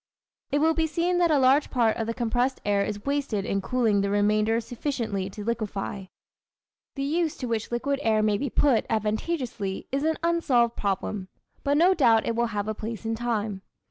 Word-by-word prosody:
It 285 - +1
will 320 +2 +3
be 320 0 +1
seen 345 +3 0
that 345 -1 +3
a 305 - +4
large 270 +2 +4
part 230 -4 +2
of 225 - -2
the 230 - -2
compressed 245 +2 0
air 200 -1 +2
is 205 0 -5
wasted 275 -8 -1
in 195 -1 -1
cooling 220 -2 +1
the 200 - 0
remainder 210 +2 +2
sufficiently 225 -5 -3
to 205 +2 -8
liquefy. 205 -3 -3 0.9
The 275 - -3
use 315 +2 0
to 255 - -4
which 230 -2 -2
liquid 275 +4 -1
air 220 -3 +2
may 210 -1 +2
be 280 - -2
put, 255 -2 +2
advantageously, 215 - -2
is 275 +2 -1
an 320 0 +1
unsolved 270 -9 +2
problem; 195 -1 -2 0.4
but 285 +1 +2
no 355 +4 +5
doubt 230 -9 +4
it 230 - -1
will 235 +1 +1
have 210 -2 -3
a 215 - -1
place 220 +1 -6
in 225 - -1
time. 220 -4 -2
230 Hz, 195 wpm, -26 LUFS, 210-280 Hz, 0.9 s, no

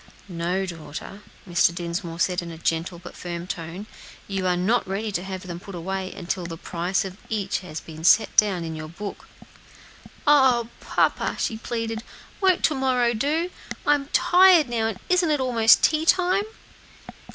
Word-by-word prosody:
"No, 180 +2 -2
daughter," 170 +3 -8 0.3
Mr. 170 -1 +3
Dinsmore 170 -1 -4
said 180 +1 +1
in 170 - -7
a 165 - -8
gentle 165 +2 -2
but 175 +1 -11
firm 175 -1 -6
tone; 175 +3 -6 0.4
"you 195 -2 -2
are 180 -1 +2
not 210 +7 +1
ready 205 +3 -2
to 180 - -2
have 190 0 -6
them 175 -1 -6
put 195 0 -10
away 190 +2 -4
until 180 -1 -4
the 165 -1 -7
price 180 +4 -2
of 190 0 -7
each 205 -3 -1
has 160 -4 -7
been 160 0 -11
set 210 +6 +5
down 195 -5 +3
in 160 -1 -5
your 155 0 -6
book." 195 +5 -8 1.0
"Oh! 260 -6 +4
papa," - - 0
she 225 - -1
pleaded, 225 0 -4 0.4
"won't 375 -2 +3
to 310 - +4
morrow 255 -3 +1
do? 310 +10 0 0.3
I'm 290 -1 +2
tired 350 -1 +5
now, 225 -2 0
and 220 -4 -4
isn't 360 -2 +3
it 300 -2 +2
almost 235 -4 +4
tea 310 0 +3
time?" 370 +2 +3
195 Hz, 170 wpm, -24 LUFS, 175-250 Hz, 1.0 s, set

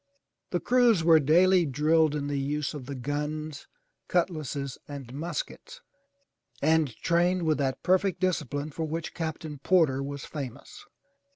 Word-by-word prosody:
The 175 - 0
crews 240 -7 +3
were 165 -1 +7
daily 175 +5 +5
drilled 150 +2 +2
in 145 -1 -2
the 145 -1 -1
use 145 +2 -2
of 140 -4 -8
the 140 - -5
guns, 150 +3 -4 0.4
cutlasses 155 -6 -1
and 135 -4 -8
muskets 480 - -5 0.8
and 155 0 +3
trained 175 +1 +2
with 155 -2 +1
that 135 -2 -1
perfect 185 0 +2
discipline 155 -5 -1
for 160 +3 -3
which 160 +1 -4
Captain 155 -3 -5
Porter 155 -5 +3
was 140 0 -5
famous. 145 - -8
155 Hz, 135 wpm, -28 LUFS, 145-175 Hz, 0.8 s, were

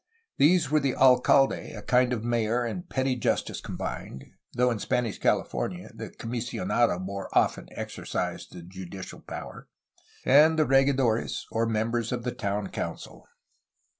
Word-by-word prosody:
These 155 -1 +4
were 155 - +4
the 135 -3 0
alcalde, 135 +1 +4
a - - -8
kind 125 0 +3
of 115 -3 -2
mayor 120 0 +1
and 175 +10 -5
petty 130 -1 0
justice 120 - -1
combined 65 - -6 0.3
(though 125 0 +2
in 115 - -2
Spanish 115 +1 -1
California 180 0 -1
the 110 0 -7
comisionado 115 -3 -1
more 95 +1 -5
often - - +2
exercised - - -4
the 90 - -10
judicial 95 +1 -9
power), - - -9 0.6
and 155 +4 +6
the 155 - +4
regidores, 135 -4 +2
or 115 0 0
members 115 +1 -1
of 120 -2 -2
the 125 - -2
town 100 -4 -2
council. - - -6
120 Hz, 140 wpm, -27 LUFS, 110-135 Hz, 0.6 s, and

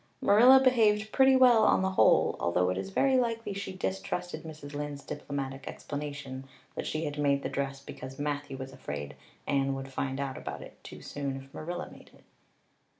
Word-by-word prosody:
Marilla 245 +6 +7
behaved 220 -5 +3
pretty 265 -1 +5
well 250 -3 +6
on 190 - +4
the 190 - +1
whole, 190 - +4
although 90 +1 +1
it 90 - -2
is 95 0 -5
very 260 - +3
likely 230 -3 -1
she 200 0 -5
distrusted 185 -1 -3
Mrs. 155 -3 -9
Lynde's 145 -1 -5
diplomatic 140 -2 -5
explanation 140 -2 -6 0.3
that - - -4
she 155 +1 -2
had 145 0 -4
made 140 -1 +2
the - - -2
dress 135 0 -3
because 130 -1 -9
Matthew 145 -1 -3
was 130 0 -7
afraid 75 - -6 0.3
Anne 135 -1 +1
would 135 0 -7
find 135 0 -2
out 135 -1 -3
about - - -6
it - - -15
too - - -10
soon 140 -2 -4
if 135 0 -12
Marilla 175 +3 -5
made - - -15
it. - - -22
145 Hz, 185 wpm, -29 LUFS, 135-190 Hz, 0.3 s, Marilla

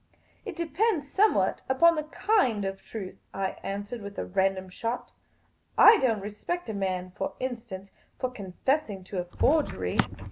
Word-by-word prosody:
" - - -35
It - - -4
depends 340 -1 0
somewhat 415 +8 +3
upon 335 +6 +6
the 305 -2 -2
kind 305 - +2
of 195 0 -4
truth," 195 -5 -7 0.2
I 195 -1 -2
an 200 +1 -3
swered, 225 +3 -7
with 200 0 -8
a - - -2
random 190 0 +1
shot. 230 +6 -4 0.4
" - - -40 0.2
I 450 - +3
don't 225 -6 +2
respect 215 - -4
a - - -2
man, 185 -2 -2
for - - -3
instance, 230 -6 -5 0.3
for 255 - -2
confessing 205 - -1
to 185 0 -4
a 175 - -2
forgery." 175 - +1
215 Hz, 170 wpm, -28 LUFS, 195-285 Hz, 0.4 s, upon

